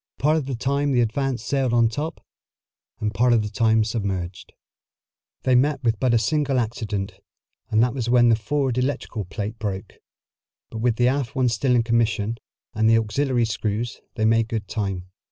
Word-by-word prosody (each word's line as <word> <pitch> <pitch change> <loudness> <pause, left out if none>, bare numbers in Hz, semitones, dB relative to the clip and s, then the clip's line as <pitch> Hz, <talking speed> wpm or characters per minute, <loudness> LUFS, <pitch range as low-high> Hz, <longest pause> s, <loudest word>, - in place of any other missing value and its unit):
Part 150 +2 +2
of 150 -4 -1
the 135 - -2
time 140 +3 0
the 120 - +3
Advance 120 +1 -1
sailed 130 -1 0
on 120 -1 +4
the 115 - +3
top, 155 +7 -5 0.7
and 105 0 -2
part 120 +3 +3
of 115 -2 +3
the 105 - -5
time 110 0 +3
submerged. 100 -5 -4 0.9
They 130 - +2
met 140 +2 +2
with 115 -3 +1
but 130 -2 +2
a - - +6
single 140 +4 +1
accident, 110 -4 -3 0.5
and 110 +1 +4
that 125 - +1
was 120 -3 -3
when 120 -1 +5
the 115 - +5
forward 130 +3 -1
electrical 125 -5 -2
plate 105 +4 -5
broke. 100 -3 -4 0.8
But 115 - -5
with 115 0 +1
the 120 +1 +3
aft 135 0 -1
one 130 -2 +2
still 125 +2 +1
in 120 - +3
commission, 115 -1 0 0.3
and 110 +1 +2
the 115 - +6
auxiliary 120 +2 +1
screws, 110 +1 -3
they 110 - 0
made 115 0 +3
good 110 -4 -4
time. 95 -4 -3
115 Hz, 190 wpm, -23 LUFS, 110-130 Hz, 0.9 s, a